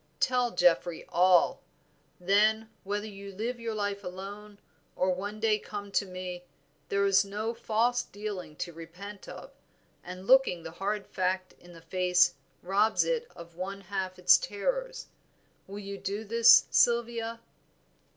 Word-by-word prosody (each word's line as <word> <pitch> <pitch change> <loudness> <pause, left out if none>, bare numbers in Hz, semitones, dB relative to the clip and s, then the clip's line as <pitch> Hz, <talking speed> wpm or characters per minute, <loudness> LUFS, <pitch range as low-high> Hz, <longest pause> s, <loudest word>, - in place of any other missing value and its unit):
Tell 250 -1 +2
Geoffrey 175 -4 +2
all; 180 0 +4 0.6
then, 215 +4 +2
whether 205 +2 -3
you 200 -1 -9
live 230 +5 -4
your 230 -1 -4
life 205 -1 -2
alone, 200 +3 -8 0.4
or 185 0 +1
one 205 +4 -5
day 215 -1 +2
come 205 -1 -7
to 200 - 0
me, 180 -1 -6 0.5
there 200 0 +1
is 195 0 +4
no 210 +3 -3
false 235 +2 +1
dealing 200 -6 -7
to 170 +2 -5
repent 180 +5 -10
of, - - -10 0.5
and 185 +1 -9
looking 250 -9 +4
the 165 - -7
hard 200 +4 -3
fact 185 0 -2
in 175 0 -15
the 165 - -13
face 180 -1 +3 0.3
robs 205 +4 +2
it 480 -1 -1
of 170 0 -12
one 195 +3 -6
half 190 -1 -4
its 180 - +6
terrors. - - -3 0.6
Will 200 +1 -8
you 200 -1 -7
do 200 +3 -4
this, 230 +2 +6
Sylvia?" 235 -1 +2
200 Hz, 145 wpm, -29 LUFS, 185-220 Hz, 0.6 s, its